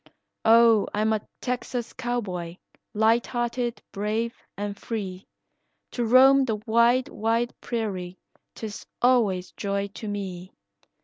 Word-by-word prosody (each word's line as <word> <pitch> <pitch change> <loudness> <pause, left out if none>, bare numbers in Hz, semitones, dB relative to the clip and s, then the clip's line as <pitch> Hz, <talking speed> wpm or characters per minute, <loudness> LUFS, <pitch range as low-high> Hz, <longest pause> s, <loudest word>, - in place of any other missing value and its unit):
"Oh, 230 -1 +6
I 210 - 0
am 220 0 +2
a 215 - 0 0.2
Texas 245 -1 -3
cowboy, 195 -9 -3 0.4
lighthearted, 235 +2 +1
brave, 215 +3 -1 0.2
and 205 0 -3
free, 195 -4 -5 0.6
To 240 - -2
roam 265 +4 +6
the 225 -4 0
wide, 235 +3 +4
wide 230 +2 0
prairie, 190 -6 -3 0.4
'tis 215 -2 -7 0.2
always 215 -8 +3
joy 200 0 -2
to 215 +2 -8
me. 190 -3 -5
220 Hz, 115 wpm, -26 LUFS, 200-240 Hz, 0.6 s, Oh